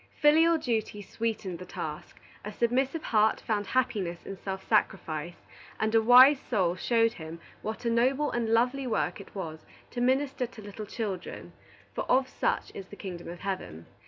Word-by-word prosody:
Filial 325 +3 +5
duty 225 -7 -2
sweetened 210 -5 -3
the 185 - -8
task, 155 -1 -6 0.2
a 210 - -5
submissive 260 +8 0
heart 215 -1 +3
found 205 -3 -2
happiness 210 -10 -1
in 195 - -6
self 190 0 -6
sacrifice, 175 -6 -1 0.3
and 220 0 0
a 225 - +5
wise 255 +5 +8
soul 185 -10 0
showed 230 +3 +2
him 160 +1 -8 0.2
what 220 +3 -5
a - - +2
noble 260 +5 +2
and 235 -2 -1
lovely 250 +4 +2
work 220 -3 -1
it 200 - -15
was 160 -5 -6 0.3
to 245 - -3
minister 260 0 +1
to 230 -2 -12
little 205 +1 -8
children, 200 -6 -5 0.4
for - - -3
of 260 +1 +3
such - - -1
is 195 - -8
the 205 - -11
kingdom 180 -4 -7
of 175 0 -8
heaven. 185 - -4
220 Hz, 170 wpm, -29 LUFS, 190-250 Hz, 0.4 s, wise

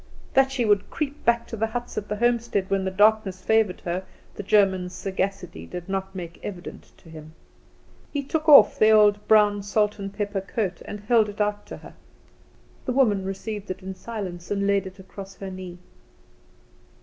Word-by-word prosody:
That 270 0 +4
she 255 -3 0
would 205 -2 +2
creep 290 -1 -4
back 235 0 +3
to - - -5
the 225 +1 0
huts 240 +2 -5
at 210 - -4
the 210 - -1
homestead 235 -4 0
when 195 -1 +1
the - - 0
darkness 200 -1 +2
favoured 220 -3 +2
her, 180 +2 -3 0.3
the - - -6
German's 190 -3 +2
sagacity 190 -1 -4
did 180 -1 -7
not 195 0 -4
make 170 -2 -7
evident 180 -4 -8
to 165 - -18
him. 155 0 -12 0.8
He 285 -1 -2
took 310 +3 -1
off 290 - +8
the 215 - +6
old 210 -1 +4
brown 210 -1 +4
salt 210 +1 0
and 195 0 -5
pepper 200 -1 -3
coat, 195 -2 -3
and 205 - -7
held 220 0 +3
it 205 - -10
out 205 0 -1
to - - -8
her. - - -13 0.9
The 255 - -1
woman 215 -8 +2
received 205 +2 -5
it 185 +1 -6
in 190 0 -5
silence, 185 -4 -7
and 200 -1 0
laid 200 -1 +1
it 190 +1 -11
across 195 0 -10
her 195 -1 -7
knee. 185 -1 -8
200 Hz, 185 wpm, -24 LUFS, 190-220 Hz, 0.9 s, off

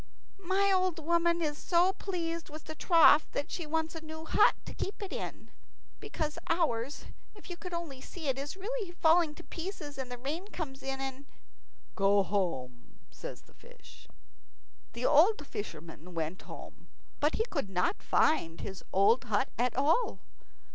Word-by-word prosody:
"My 395 +1 +3
old 370 -2 +2
woman 340 +1 +2
is 295 -1 -2
so 360 +2 +3
pleased 335 -5 -3
with 310 +1 -9
the 315 - -7
trough 315 -1 +6
that 285 - -2
she 335 -4 -4
wants 320 +1 -1
a 325 - -6
new 315 0 -8
hut - - +5
to - - -7
keep 395 - -4
it 400 -3 -5
in, - - -6 0.5
because 305 -1 -3
ours, 290 -6 0 0.3
if 395 -3 -11
you - - -4
could 360 +1 -8
only 330 -6 -5
see 320 0 -7
it, 270 0 0
is 290 +7 -5
really 425 0 -3
falling 330 -2 +3
to 345 - -11
pieces, 330 -6 -6
and 255 -2 -5
the 245 - -4
rain 300 +10 -4
comes 290 -9 -6
in 270 0 -3
and 270 +1 -5 0.3
." - - -37
"Go 200 0 +4
home," 135 -12 -3
says - - -8
the - - -24
fish. - - -16 0.9
The 235 +1 -3
old 310 +3 +5
fisherman 170 - -7
went 165 +3 -3
home, - - -11 0.3
but 295 +2 +2
he 445 - +1
could 280 - -2
not 190 - 0
find 165 - +2
his 190 -2 -6
old 205 +7 +4
hut 220 +3 +1
at 245 0 +1
all. 305 - +2
310 Hz, 170 wpm, -31 LUFS, 250-345 Hz, 0.9 s, trough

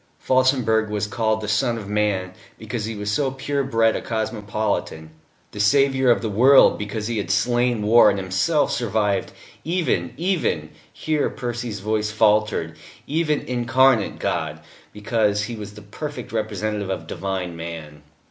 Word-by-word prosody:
Felsenburgh 130 -4 +2
was 105 -1 -1
called 110 +1 -1
the 105 - -5
Son 115 +3 +1
of 105 -3 -7
Man, 100 -3 -1 0.2
because 110 0 -5
he 115 0 -4
was 105 0 -3
so 135 +5 +1
pure 140 +1 -2
bred 115 -4 +2
a - - -3
cosmopolitan; 105 -7 -3 0.4
the 105 - -9
Saviour 135 +4 +3
of 120 - +3
the - - 0
World, 130 +7 +5
because 105 +1 -4
he 115 -1 -2
had 100 - -4
slain 120 +2 +1
war 110 +1 +6
and 100 - 0
himself 95 - +1
survived 105 -4 0 0.3
even 155 - -1
even 160 - -1 0.2
here 155 -2 -1
Percy's 120 -4 -5
voice 105 +1 -1
faltered 105 0 +1 0.3
even 155 0 0
Incarnate 125 0 +2
God, - - -3 0.3
because 105 -1 0
he 115 +2 -5
was 105 -1 -8
the 105 - -11
perfect 130 +5 -7
representative 105 -2 -2
of 90 -4 -3
divine 95 -1 -4
man. 80 -3 -8
110 Hz, 150 wpm, -22 LUFS, 105-125 Hz, 0.4 s, war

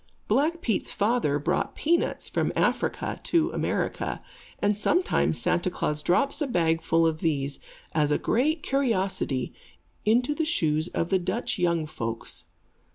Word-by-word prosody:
Black 305 +9 +1
Pete's 220 -5 0
father 205 -9 +1
brought 165 +5 -1
peanuts 335 +3 0
from - - 0
Africa - - 0
to 335 +1 +1
America, - - -2 0.3
and 205 0 +1
sometimes 330 - +1
Santa 175 - +1
Klaas 150 -4 -2
drops 275 - +1
a 295 - +1
bagful 165 -4 +2
of 160 -1 0
these, 140 -4 -1 0.3
as 150 -2 +1
a 145 - +3
great 300 +6 +1
curiosity, 195 - 0 0.5
into 245 +6 +3
the 320 - -1
shoes 160 - +1
of 170 -1 -2
the 190 - +3
Dutch 175 - -2
young 170 -2 +1
folks. 115 -6 -5
185 Hz, 140 wpm, -26 LUFS, -, 0.5 s, a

